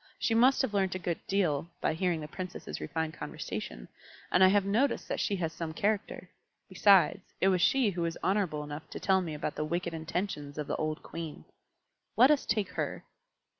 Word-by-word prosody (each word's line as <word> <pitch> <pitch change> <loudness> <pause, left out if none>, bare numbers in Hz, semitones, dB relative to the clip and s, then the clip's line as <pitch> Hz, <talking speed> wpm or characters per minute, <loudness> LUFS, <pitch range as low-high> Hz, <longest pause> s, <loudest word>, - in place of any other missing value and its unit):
She 225 - 0
must 255 +4 +5
have 230 - -2
learnt 190 -2 +1
a - - 0
good 175 -2 -3
deal 170 -5 +1
by - - +1
hearing 170 -1 0
the 150 - -6
Princesses' 180 +3 -6
refined 160 -1 -2
conversation, - - -6 0.4
and 180 - +5
I - - +9
have 200 +1 +3
noticed 230 +8 +1
that - - -1
she 200 - 0
has 165 -4 -2
some 165 -1 -5
character. 205 +2 -1 0.4
Besides, 195 -2 +5 0.2
it 190 - +4
was 185 -2 +2
she 250 +1 +4
who 175 -2 -4
was 165 -1 -1
honourable 185 -7 0
enough 145 +1 -8
to - - -6
tell 190 -1 +3
me 165 -4 -4
about 150 0 -3
the - - -2
wicked 170 +2 -2
intentions 160 -2 -4
of 150 - -2
the - - -2
old 155 0 -2
Queen. 160 - -7 0.7
Let 255 +5 +7
us 295 - +1
take 210 -2 0
her." - - -3
180 Hz, 200 wpm, -30 LUFS, 160-200 Hz, 0.7 s, I